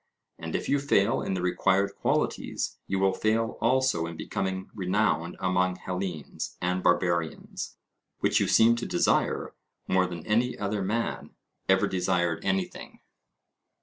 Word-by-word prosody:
And - - -5
if - - -2
you 145 - +2
fail 115 -7 +2
in 95 - -2
the 90 - -2
required 95 +2 +2
qualities, - - -1
you 95 - 0
will 95 0 +3
fail 110 +3 0
also 125 -9 +2
in 85 -1 -7
becoming 95 -2 -3
renowned 95 -3 0
among 90 0 +1
Hellenes 90 -4 -5
and 90 +1 0
Barbarians, 85 -2 0 0.4
which - - +3
you - - +1
seem 115 +1 +5
to 120 - -3
desire - - +1 0.3
more 95 0 +3
than 85 -3 -7
any 120 +4 +1
other 100 0 -2
man 110 +5 -2 0.3
ever - - +5
desired 90 -2 0
anything. 95 -1 -3
95 Hz, 140 wpm, -28 LUFS, 90-105 Hz, 0.4 s, seem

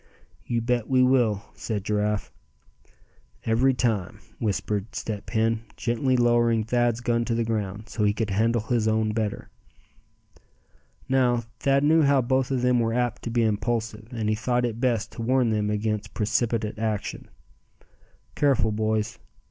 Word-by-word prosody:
"You 120 -1 0
bet 120 -1 -1
we 130 -1 +4
will," 120 -6 +2
said 105 -4 -4
Giraffe. 105 0 -1 1.1
"Every 125 +4 +3
time," 110 -8 -1 0.2
whispered 105 0 -2
Step 105 -1 -5
Hen, 115 0 +1 0.2
gently 125 +2 +1
lowering 120 -2 +3
Thad's 120 0 +1
gun 120 -1 +1
to 115 - -1
the 115 - +1
ground, 105 -1 -3
so 105 - -2
he 105 - +4
could 110 0 -2
handle 115 +3 +2
his 115 -1 0
own 110 0 +1
better. 110 -2 -3 1.6
Now, 125 -3 +2 0.2
Thad 140 0 +2
knew 160 +2 +5
how 140 -2 +4
both 130 +1 +1
of 130 -2 -1
them 125 -1 +3
were 115 0 0
apt 120 -1 -1
to - - -2
be 115 0 +1
impulsive, 110 0 -1
and 115 -3 -3
he 110 - +2
thought 120 +3 0
it 115 0 -4
best 115 -4 0
to - - -7
warn 125 0 +2
them 105 -1 0
against 105 0 -2
precipitate 110 0 0
action. 110 -2 -3 1.0
"Careful, 130 -7 +2
boys. 110 +1 -1
115 Hz, 155 wpm, -25 LUFS, 110-120 Hz, 1.6 s, knew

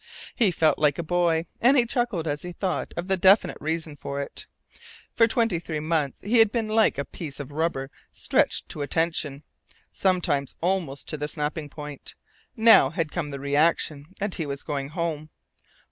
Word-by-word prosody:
He 225 -5 +3
felt 160 -4 +2
like 150 -2 +3
a 170 - -2
boy, 170 -1 +1 0.2
and 265 +4 +5
he 245 - +4
chuckled 235 -9 -1
as 145 0 -2
he 180 0 -7
thought 185 0 -2
of 175 +1 -3
the 190 -1 +1
definite 190 +3 +4
reason 160 0 -3
for 140 0 -5
it. 140 - -6 0.7
For 230 - +5
twenty 225 -6 +1
three 160 -2 -4
months 155 -3 -1
he 225 +4 +2
had 225 -2 +6
been 225 -2 -1
like 220 0 +3
a 140 - -2
piece 150 -5 -8
of 140 0 -7
rubber 145 -3 -2 0.2
stretched - - +1
to 150 - -4
a 145 - -2
tension 155 -3 -1 0.5
sometimes 175 -7 0
almost 170 -6 -1
to 155 - -2
the 150 0 -3
snapping 150 0 -3
point. 150 -1 -9 0.4
Now 225 -11 +7
had 160 0 -2
come 165 -4 -3
the 140 -1 -6
reaction, 145 +1 +1
and 200 -1 -2
he 160 - -4
was 140 -1 -5
going 140 -2 -3
HOME. 155 -2 -3
160 Hz, 185 wpm, -25 LUFS, 145-185 Hz, 0.7 s, Now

